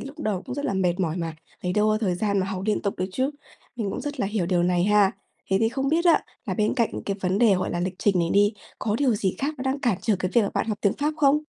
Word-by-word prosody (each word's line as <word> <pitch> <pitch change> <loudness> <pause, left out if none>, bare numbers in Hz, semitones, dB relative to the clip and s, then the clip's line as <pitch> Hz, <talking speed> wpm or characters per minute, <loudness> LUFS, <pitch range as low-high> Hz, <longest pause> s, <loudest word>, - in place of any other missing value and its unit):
lúc 280 +3 -9
đầu 205 -9 -2
cũng - - -6
rất 285 +1 -4
là 285 - 0
mệt 180 -1 +1
mỏi 165 -2 0
mà, 165 -3 -3 0.3
lấy 180 - -1
đâu 210 +2 +3
có 215 0 +2
thời 190 -5 +1
gian 200 +2 0
mà 185 - -1
học 190 -1 -4
liên 215 - +1
tục 200 - -1
được 185 - 0
chứ. 260 +5 0 0.5
Mình 210 -5 -2
cũng - - -4
rất 290 -2 -5
là - - +1
hiểu 200 -4 -1
điều 175 -1 +2
này 175 0 +2
ha. 205 -1 +4 0.4
Thế 190 - +4
thì 225 - +3
không 270 +3 -2
biết 325 +4 +2
á, 345 - +5 0.3
là - - -1
bên 215 +1 +1
cạnh 235 -4 +1 0.2
cái 200 - -1
vấn 185 +1 0
đề, 225 -4 +5
gọi 185 - -1
là, 175 - -2
lịch 185 +1 -2
trình 195 -3 +2
này 170 -1 +1
đi, 205 +2 +4 0.3
có 210 0 -1
điều 265 -5 +3
gì 195 -3 0
khác 290 +3 -1
nó 255 - -4
đang 265 +1 -1
cản 235 -9 +1
trở 215 -3 +1
cái 185 - -2
việc 235 - +6
mà 200 - -1
bạn - - 0
học 210 - -2
tiếng 200 - +3
Pháp 300 +2 -1
không? 295 0 +3
205 Hz, 310 wpm, -25 LUFS, 185-255 Hz, 0.5 s, việc